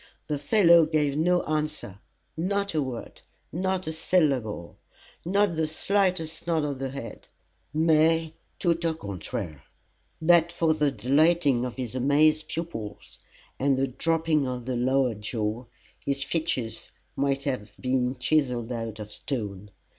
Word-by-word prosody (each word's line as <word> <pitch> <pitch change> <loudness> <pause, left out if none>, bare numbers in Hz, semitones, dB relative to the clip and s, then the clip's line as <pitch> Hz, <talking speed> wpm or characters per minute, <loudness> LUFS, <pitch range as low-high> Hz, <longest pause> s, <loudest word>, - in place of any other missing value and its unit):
The 150 -2 -2
fellow 170 0 +5
gave 150 -3 +1
no 175 +3 +2
answer, 150 -10 -3 0.4
not 200 +4 -1
a 155 - +1
word, 130 -4 -6 0.3
not 185 +2 -1
a 160 - -3
syllable 135 - 0 0.4
not 195 0 +2
the 160 -1 +1
slightest 170 -1 0
nod 165 -2 +2
of 140 -3 -3
the 135 0 -2
head, 130 -5 -8 0.4
mais, 160 +1 +3 0.3
tout 170 -1 +1
au 165 -1 +1
contraire. 95 - -5 0.6
But 170 +1 +4
for 165 -2 +2
the 150 -2 +2
dilating 140 +2 +3
of 125 - -5
his 125 -3 -5
amazed 150 +4 +3
pupils, 135 -12 -6 0.4
and 135 0 +2
the 135 - +2
dropping 160 +1 +1
of 125 -2 -4
the 130 0 -2
lower 130 0 +2
jaw, 110 +2 -3 0.4
his 140 0 -1
features 130 -9 -2 0.3
might 140 0 0
have 125 -7 -3
been 130 0 0
chiselled 125 -4 +1
out 115 -2 -4
of 105 -1 -8
stone. 105 -7 -5
145 Hz, 140 wpm, -27 LUFS, 125-165 Hz, 0.6 s, fellow